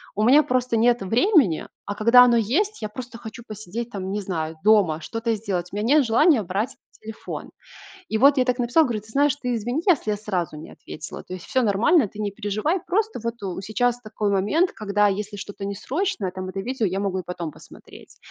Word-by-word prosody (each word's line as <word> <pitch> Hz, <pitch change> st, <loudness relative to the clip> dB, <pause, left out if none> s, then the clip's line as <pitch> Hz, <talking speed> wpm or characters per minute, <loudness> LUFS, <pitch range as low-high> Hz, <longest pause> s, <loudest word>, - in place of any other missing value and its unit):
у 210 Hz, -, 0 dB
меня 280 Hz, +6 st, +6 dB
просто 255 Hz, -3 st, 0 dB
нет 240 Hz, +1 st, +3 dB
времени, 230 Hz, -, +2 dB, 0.2 s
а 205 Hz, -, -4 dB
когда 235 Hz, +4 st, +7 dB
оно 240 Hz, -1 st, +4 dB
есть, 350 Hz, -, 0 dB
я 215 Hz, -, -2 dB
просто 235 Hz, +2 st, -9 dB
хочу 235 Hz, +1 st, -10 dB
посидеть 215 Hz, +3 st, -6 dB
там, 190 Hz, -4 st, -5 dB
не 210 Hz, -, -2 dB
знаю, 160 Hz, -4 st, -4 dB
дома, 200 Hz, -7 st, +4 dB
что-то 225 Hz, +4 st, -2 dB
сделать, 185 Hz, -4 st, -3 dB
у -, -, -5 dB
меня 230 Hz, +9 st, +3 dB
нет 285 Hz, -, +4 dB
желания 245 Hz, +4 st, +4 dB
брать 205 Hz, +7 st, -3 dB, 0.2 s
телефон". 220 Hz, 0 st, -8 dB, 0.6 s
И 220 Hz, -, 0 dB
вот 280 Hz, +4 st, +6 dB
я 255 Hz, -, +3 dB
так 250 Hz, 0 st, 0 dB
написала, 245 Hz, +7 st, +3 dB
говорю: 230 Hz, -5 st, -2 dB
"Ты 215 Hz, -, -20 dB
знаешь, 285 Hz, +3 st, +2 dB
ты 250 Hz, -3 st, -3 dB
извини, 240 Hz, +6 st, -2 dB
если 290 Hz, -11 st, +3 dB
я 210 Hz, -, 0 dB
сразу 185 Hz, -7 st, -3 dB
не 155 Hz, -, -10 dB
ответила. 155 Hz, -, -9 dB
То -, -, -12 dB
есть 185 Hz, -2 st, -7 dB
всё 260 Hz, -, +1 dB
нормально, 215 Hz, -, +3 dB
ты 210 Hz, -, -15 dB
не 210 Hz, -1 st, -2 dB
переживай. 215 Hz, -, -1 dB
Просто 430 Hz, -, -1 dB
вот 230 Hz, -1 st, -4 dB
у 190 Hz, -1 st, -4 dB
сейчас 245 Hz, +4 st, 0 dB
такой 215 Hz, -2 st, -2 dB
момент, 210 Hz, -, +2 dB
когда 205 Hz, -1 st, +1 dB
если 205 Hz, +1 st, -3 dB
что-то 200 Hz, 0 st, -7 dB
не 200 Hz, 0 st, -3 dB
срочное, 260 Hz, -, -2 dB
там 185 Hz, 0 st, -6 dB
это 195 Hz, -, -6 dB
видео 240 Hz, 0 st, -1 dB
я 190 Hz, +2 st, -2 dB
могу 190 Hz, -2 st, -1 dB
и -, -, -8 dB
потом 170 Hz, -3 st, -5 dB
посмотреть". -, -, -15 dB
220 Hz, 215 wpm, -23 LUFS, 200-250 Hz, 0.6 s, когда